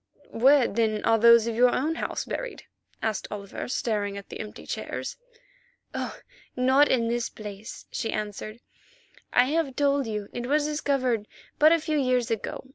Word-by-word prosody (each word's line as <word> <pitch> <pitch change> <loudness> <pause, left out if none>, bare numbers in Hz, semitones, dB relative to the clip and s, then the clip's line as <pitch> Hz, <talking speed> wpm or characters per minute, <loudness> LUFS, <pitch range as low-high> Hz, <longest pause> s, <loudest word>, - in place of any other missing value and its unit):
"Where, 265 +2 +5
then, 215 -1 0
are 225 0 +4
those 235 0 +7
of 230 - -1
your 250 +2 +5
own 295 +6 0
house - - -3
buried?" - - -5 0.4
asked 220 -3 -1
Oliver, 200 -1 -6
staring 205 -5 -1
at 200 - -10
the - - -8
empty 210 -1 -8
chairs. - - -4 0.8
"Oh! - - -4 0.4
not 260 +3 +4
in 235 -3 +2
this 235 0 -1
place," 210 0 -9
she 225 - -2
answered; 215 +2 -5 0.7
"I 245 - +5
have 290 -1 0
told 280 -2 +2
you 210 -2 -3
it 240 0 -4
was 295 +2 +2
discovered 270 -7 0 0.3
but 310 +1 +7
a 335 - +6
few 310 -1 -1
years 255 -3 +1
ago. 225 - -3
240 Hz, 165 wpm, -26 LUFS, 215-280 Hz, 0.8 s, those